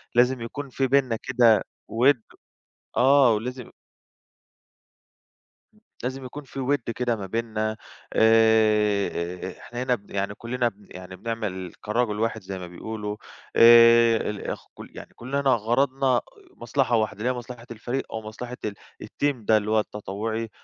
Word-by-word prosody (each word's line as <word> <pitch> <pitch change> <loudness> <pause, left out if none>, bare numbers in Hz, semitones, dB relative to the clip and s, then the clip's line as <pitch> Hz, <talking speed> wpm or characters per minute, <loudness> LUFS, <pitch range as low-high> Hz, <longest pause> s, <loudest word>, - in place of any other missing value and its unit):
لازم 125 +1 +3
يكون 140 +5 -6
فيه 135 +1 -1
بيننا 130 -3 +2
كده 120 -5 +4 0.3
وِد" 125 +1 +3 0.8
آه، 135 -1 +6
ولازم 125 +3 -4 2.3
لازم 130 +1 -4
يكون 145 +4 -8
فيه 135 0 -7
وِد 135 -2 -1
كده 120 -1 0
ما 100 -3 -6
بيننا. 110 +1 -2 0.4
آآ 105 -5 +3
إحنا 120 +1 -6
هنا 125 -1 +2
ب 100 -2 -17
يعني 100 0 -2
كُلّنا 120 +1 -1
ب 100 -2 -21
يعني 90 0 -9
بنعمل 95 -4 -4
كراجل 105 0 -1
واحد 115 0 -1
زي 95 0 -6
ما 90 - -7
بيقولوا. 105 +3 -6 0.4
آآ 115 0 +7
ال 105 -1 -6
اخ - - -5
كل - - -11
يعني - - -11
كُلّنا 130 +4 -3
غرضنا 130 +3 +2
آآ 120 - +1 0.3
مصلحة 120 0 0
واحدة، 110 -2 -1
اللي 120 +4 0
هي - - +1
مصلحة 120 -1 -8
الفريق، 120 +4 -3
أو 110 - -4
مصلحة 120 +3 -8
ال 105 - -2 0.3
الTeam 145 -1 -1
ده، 110 - +5
اللي 105 0 -2
هو 110 - +4
التطوُّعي، 110 +2 -4
115 Hz, 150 wpm, -25 LUFS, 105-125 Hz, 2.3 s, آآ